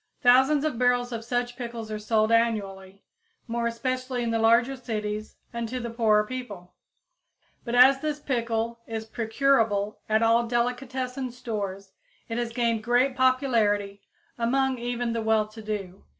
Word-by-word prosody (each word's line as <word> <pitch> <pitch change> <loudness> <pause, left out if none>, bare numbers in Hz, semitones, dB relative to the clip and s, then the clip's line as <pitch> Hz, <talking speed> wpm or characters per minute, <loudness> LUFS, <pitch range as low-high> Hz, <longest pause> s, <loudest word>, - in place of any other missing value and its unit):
Thousands 265 +4 +5
of 295 -7 -2
barrels 245 0 +2
of 230 -1 -4
such 245 +1 -2
pickles 235 -3 -6
are 215 - -3
sold 215 +1 +1
annually, 200 -4 0 0.4
more 235 0 -1
especially 255 +1 -2
in 230 - -1
the 225 - 0
larger 235 +4 +4
cities 215 -4 -4 0.2
and 235 -1 -3
to 255 +1 -3
the 235 -1 -5
poorer 215 -2 +3
people; 210 -8 -7 0.9
but 235 0 -3
as 265 +2 +7
this 300 -1 -2
pickle 235 -4 -2
is 220 -1 -4
procurable 225 -3 +1
at 220 +1 +3
all 230 +1 +3
delicatessen 250 +2 -2
stores, 205 -6 -5 0.4
it 230 +1 -2
has 240 -1 -2
gained 230 -2 0
great 245 +3 +2
popularity 225 -7 +1 0.4
among 260 +2 +1
even 240 0 -2
the 230 - -1
well 220 -1 +2
to 220 +1 -11
do. 200 -3 -5
235 Hz, 150 wpm, -26 LUFS, 220-250 Hz, 0.9 s, as